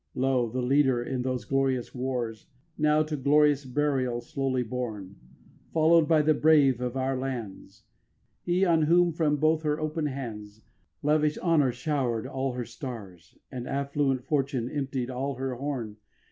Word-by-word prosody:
8. - - -5
Lo, 130 -3 +1
the 125 +2 -3
leader 130 -2 +3
in 130 0 -3
these 130 -1 -2
glorious 135 -2 0
wars 125 -4 -3 0.3
Now 150 0 +3
to 155 0 -4
glorious 145 0 +3
burial 130 -2 0
slowly 130 0 -2
borne, 110 -5 -5 0.6
Followed 160 0 +4
by 155 -2 +4
the 155 +1 +4
brave 145 -5 +4
of 125 +1 -3
other 130 0 0
lands, 110 -5 -6 0.6
He, 180 +2 +1
on 165 -3 +3
whom 170 +3 +4
from 155 -2 +1
both 155 +2 +2
her 150 -1 -1
open 155 0 -2
hands 110 -6 -7 0.4
Lavish 150 0 +2
Honour 155 -7 +2
showered 125 -3 -2
all 135 -1 -2
her 125 -1 -4
stars, 100 - -9
And 125 -2 -6
affluent 140 -1 -1
Fortune 135 -4 -1
emptied 135 -3 -3
all 135 +2 -3
her 130 +1 -3
horn. 125 -5 -4
135 Hz, 155 wpm, -27 LUFS, 125-150 Hz, 0.6 s, Followed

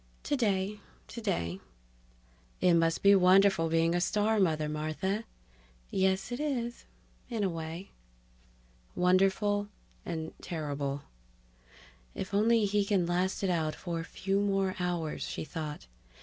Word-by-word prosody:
("Today... 210 -6 0 0.3
Today!") 135 - -2 1.0
"It 180 - +4
must 165 -1 +2
be 200 0 +8
wonderful 190 -2 +5
being 165 +1 +2
a 175 - +1
star 210 +3 +2
mother, 155 -5 +2
Martha." 155 +8 -2 0.7
("Yes, 190 +3 +1
it 245 - -3
is 245 -6 -2 0.4
in 225 -4 -1
a 195 - +2
way.") 165 +2 -6 1.0
Wonderful... 195 +3 +2 0.4
and 160 -2 -4
terrible. 145 -4 -3 1.1
If 190 - -5
only 220 +2 +4
he 205 0 +2
can 200 -3 +1
last 180 +3 0
it 190 - +2
out 160 -3 0
for 170 -2 -4
a - - -3
few 195 +3 -1
more 195 -2 +1
hours, 175 -3 -2
she - - -4
thought. 155 -2 -6
185 Hz, 125 wpm, -30 LUFS, 165-205 Hz, 1.1 s, be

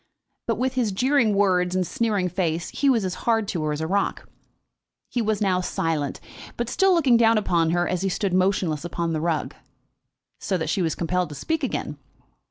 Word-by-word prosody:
But - - +1
with 260 +1 0
his 245 -5 0
jeering 250 0 +2
words, 185 -2 +2
and 185 -1 +1
sneering 205 -2 0
face, 175 -2 -2
he 280 - +1
was 230 -7 +2
as 185 - -2 0.2
hard 225 -2 +2
to 170 - -2
her 155 0 -1
as 150 +1 -3
a 160 - -2
rock. 200 +3 -1 0.8
He 245 - 0
was 215 -2 -1
now 185 -3 +2
silent, 160 -5 -2 0.4
but 240 0 -2
still 385 +7 +3
looking 270 -8 +4
down 230 -1 +4
upon 170 -6 +1
her 175 +1 +1
as 180 -1 -1
he 195 - 0
stood 190 0 -1
motionless 185 -5 +1
upon 170 -1 -2
the 155 - -1
rug, 165 -2 -1 0.9
so 190 - -1
that 160 -2 -2
she 195 - 0
was 165 -2 0
compelled 180 +1 -1
to 150 - -8
speak 320 - -2
again. 150 - -3
185 Hz, 200 wpm, -24 LUFS, 170-225 Hz, 0.9 s, looking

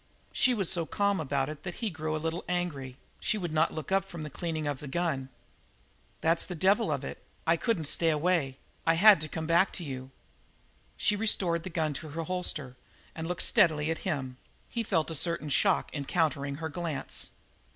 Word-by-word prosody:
She 255 - +4
was 195 -5 0
so 170 -3 +1
calm 200 -1 +1
about 140 -3 0
it 150 -1 -6
that 175 0 -5
he 225 -4 -2
grew 155 -1 -2
a - - 0
little 165 +2 -2
angry; 145 -8 -2 0.2
she 215 - 0
would 175 -5 -3
not 160 +1 +3
look 155 +3 -6
up 195 0 +4
from 170 -5 -7
the 150 - -6
cleaning 160 0 -3
of 145 -2 -2
the 150 - -7
gun. 140 -4 -1 0.9
"That's 165 +1 +3
the 180 - -5
devil 195 +3 +3
of 140 -2 -1
it; - - -7 0.2
I 165 - +4
couldn't 180 -3 0
stay 165 +3 +1
away. 155 -4 +1 0.3
I 165 - +5
had 200 -1 +8
to 155 - -2
come 160 +2 -4
back 170 +4 +4
to 180 - -4
you." 130 -3 -6 0.9
She 210 - +3
restored 190 -5 +2
the 185 - -6
gun 160 -3 0
to 155 +2 -6
her 165 +3 -3
holster 160 -7 -3 0.4
and 160 0 -4
looked 180 0 -1
steadily 155 -1 +3
at 165 - -2
him; 130 -4 -3 0.3
he 235 - -2
felt 165 -7 0
a - - -2
certain 165 -1 0
shock - - +2
in 140 -2 -3
countering 145 -4 0
her 160 +2 -4
glance. 160 -2 -3
160 Hz, 205 wpm, -30 LUFS, 150-180 Hz, 0.9 s, had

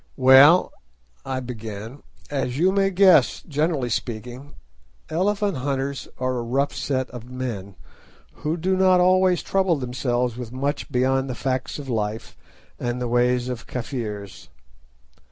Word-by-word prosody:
"Well," 135 +7 +7 0.5
I 130 -1 -3
began, 115 +1 -7 0.3
"as 135 -3 -2
you 180 +5 +3
may 195 0 +2
guess, 190 -1 +4
generally 150 -4 -1
speaking, 125 +5 -5 0.6
elephant 200 +2 0
hunters 135 +1 -3
are 130 -1 -1
a - - -2
rough 135 +5 -1
set 130 -2 -2
of 125 -1 -10
men, 115 -7 -5 0.6
who 155 +3 -2
do 185 +3 0
not 185 -1 +4 0.5
trouble 190 -3 +1
themselves 125 -2 -2
with 120 -2 -7
much 140 +3 -3
beyond 130 +1 +1
the 125 - -3
facts 130 +1 -2
of 145 -2 -8
life 110 -2 -3 0.4
and 120 0 -2
the 125 - -2
ways 125 +1 +1
of 125 -2 -6
Kafirs. 110 -6 -6
130 Hz, 135 wpm, -23 LUFS, 120-145 Hz, 0.6 s, Well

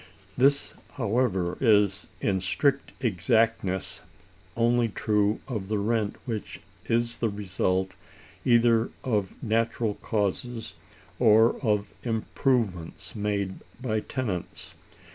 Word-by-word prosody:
This, 140 +2 +3 0.2
however, 100 -7 0
is, 100 -4 +3
in 95 -3 +1
strict 140 +9 +1
exactness, 110 -1 +1 0.6
only 120 0 +3
true 105 0 +1
of 110 -7 -4
the 105 +1 0
rent 105 0 0
which 115 -5 -5 0.3
is 115 0 0
the 115 - +1
result 95 -2 -1 0.5
either 120 -1 +4
of 105 -7 -1
natural 115 0 +1
causes, 110 +2 -2 0.5
or 115 -1 +6
of 105 -3 0
improvements 110 -5 -1
made 100 -2 -2 0.2
by 110 -4 -1
tenants. 105 -7 -4
110 Hz, 100 wpm, -27 LUFS, 100-120 Hz, 0.6 s, or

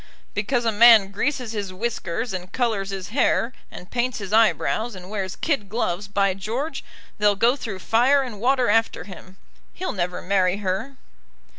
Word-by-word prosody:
"Because 235 +4 -1
a 225 - +3
man 220 -2 +7
greases 250 +2 -2
his 205 -4 -4
whiskers, 220 +1 -3
and 185 0 -6
colours 220 -6 -1
his 195 -2 -5
hair, 245 0 +1 0.2
and 180 - -12
paints 250 0 -1
his 200 -1 -6
eyebrows, 220 +2 +2
and 185 +1 -10
wears 195 -3 -3
kid 275 -11 -1
gloves, 200 -3 -2
by 200 -1 +1
George, 230 - -4 0.4
they'll 205 -1 +4
go 235 +6 +3
through 220 -8 -6
fire 250 +8 +3
and 225 -6 -8
water 255 0 +2
after 225 +2 +1
him. 190 -1 -12 0.4
He'll 370 - -3
never 180 -2 -2
marry 185 -1 +1
her." 205 +7 -3
210 Hz, 165 wpm, -23 LUFS, 195-240 Hz, 0.4 s, man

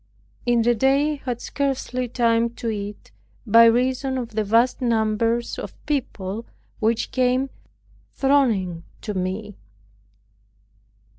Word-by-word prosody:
In 240 -1 +3
the 240 +1 +4
day 270 +5 +2
I 290 -2 -6
had 245 -2 -3
scarcely 260 -2 -2
time 230 -1 +2
to 230 - -3
eat, 205 -1 -6 0.3
by 230 +1 +7
reason 255 +3 +2
of 240 -3 -4
the 220 -1 -1
vast 230 +6 +2
numbers 230 0 0
of - - -7
people 230 -7 -3 0.3
which 225 +1 0
came 255 +1 +1 0.6
thronging 225 -12 +1 0.2
to 210 - -4
me. 190 +2 -4
235 Hz, 120 wpm, -23 LUFS, 215-255 Hz, 0.6 s, by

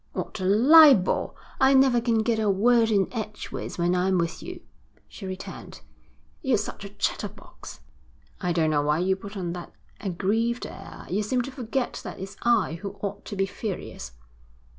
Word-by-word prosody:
'What - - -5
a 185 - -2
libel! 260 - +6 0.2
I 270 +1 +5
never 265 -3 +5
can 230 -2 +1
get 225 -1 +1
a 215 -2 +1
word 225 +4 +4
in 200 -4 +2
edgeways 215 -2 -5
when 175 0 +1
I'm 185 +1 +2
with 170 0 -2
you,' 360 -1 -8 0.5
she 195 - -9
returned. 185 0 -8 0.6
'You're 265 -6 +2
such 205 -1 -5
a 200 - -7
chatterbox.' 200 - -5 0.6
'I 180 -2 -1
don't 160 -2 +2
know 145 -1 +2
why 150 +1 +1
you 185 +3 +1
put 200 +2 -9
on 175 -3 -3
that 175 -1 -8 0.3
aggrieved 215 +6 -1
air. - - -10
You 195 +4 -1
seem 245 +4 0
to 270 - -7
forget 255 0 -3
that - - -7
it's 195 +1 -7
I 220 -8 +2
who 200 -1 -6
ought 200 0 -4
to 205 - -6
be 195 0 +1
furious.' 195 - -6
205 Hz, 175 wpm, -26 LUFS, 185-235 Hz, 0.6 s, libel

